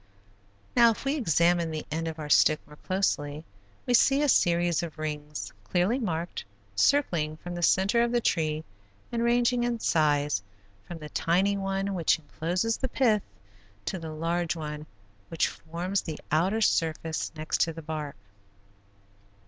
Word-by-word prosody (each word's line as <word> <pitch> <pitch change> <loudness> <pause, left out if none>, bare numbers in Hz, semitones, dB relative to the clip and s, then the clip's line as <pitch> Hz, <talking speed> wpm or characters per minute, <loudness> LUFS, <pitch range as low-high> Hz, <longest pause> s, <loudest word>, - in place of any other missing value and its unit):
Now, 235 -1 +7
if 225 - -3
we 275 - +1
examine 170 - +2
the 155 -1 -4
end 165 +1 -2
of 160 -1 -5
our 155 -1 -5
stick 155 +1 +5
more 150 - -15
closely 155 -6 -1 0.4
we 250 - +1
see 275 +4 +5
a 295 - +2
series 175 -5 +3
of 165 -2 -6
rings, 150 -1 -5
clearly 185 +8 +1
marked, 175 -7 -3 0.3
circling 155 - +2
from 175 +2 -7
the 175 - -4
center 190 +6 +3
of 235 0 +1
the 240 - +2
tree 155 -7 0 0.5
and 235 - -1
ranging 240 +1 +2
in 240 -1 -1
size 145 - +2 0.5
from 175 - -6
the 150 -1 -9
tiny 190 +7 +1
one 195 0 -2
which 170 -4 +2
encloses 175 +8 -2
the 260 - -3
pith, 225 -5 +2 0.6
to 190 - -3
the 165 -1 -6
large 165 +2 -1
one 150 -1 -6 0.4
which 165 - +1
forms 175 +4 -3
the 155 -3 -6
outer 185 +8 +2
surface 160 -4 0
next 155 0 -2
to 165 - +3
the 165 0 -9
bark. 150 -2 -5
170 Hz, 155 wpm, -28 LUFS, 155-200 Hz, 0.6 s, Now